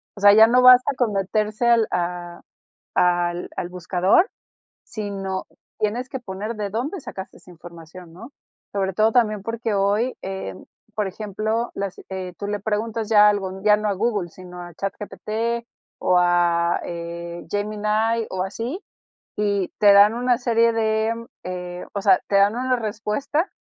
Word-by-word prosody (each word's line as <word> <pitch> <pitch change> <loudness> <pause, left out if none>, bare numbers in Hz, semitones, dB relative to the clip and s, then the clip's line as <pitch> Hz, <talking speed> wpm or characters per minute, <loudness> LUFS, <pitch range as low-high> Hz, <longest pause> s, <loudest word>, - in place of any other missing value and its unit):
O 200 - -11
sea, 205 0 +8
ya 220 +1 +8
no 250 +2 +4
basta 255 +2 +7
con 240 -5 +1
meterse 215 +4 0
al 235 -2 +4
a 175 0 -3 0.5
al 175 0 +1
al - - -3
buscador, 180 - +2 0.5
sino 195 -3 -5 0.3
tienes 225 +4 -1
que 265 - -5
poner 210 0 -5
de 210 -1 -3
dónde 255 - -3
sacaste 190 -9 -9
esa - - -19
información, 170 0 -13
¿no? 225 +10 -11 0.4
Sobre 195 -1 -1
todo 215 +4 +3
también 215 -4 +2
porque 230 +1 -3
hoy, 205 +5 +1
eh, 190 - -5
mm, 95 - -13 0.3
por 210 -2 0
ejemplo, 215 +4 -3
las 195 -2 -4
eh, 185 -1 -5
tú 205 - -5
le 205 0 -2
preguntas 220 +1 -2
ya 210 -1 +7
algo, 190 -2 -2
ya 210 0 +5
no 210 0 -1
a - - +1
Google, 205 -3 -1
sino 180 +1 -11
a 175 0 -10
ChatGPT 220 +5 -3 0.3
o 180 - +3
a, 175 -1 +2
eh, 170 0 -6
Gemini 215 +2 0
o 185 0 -2
así, 230 - -5 0.5
y 200 -3 0
te 205 -1 +7
dan 205 +2 +7
una 245 +1 +1
serie 230 -2 +2
de, 220 0 +1 0.3
eh, 180 -1 -6
o 200 - -3
sea, 190 -2 +5
te 200 - 0
dan 200 +2 +4
una 255 +1 +1
respuesta. 235 - -2
205 Hz, 160 wpm, -22 LUFS, 185-225 Hz, 0.5 s, sea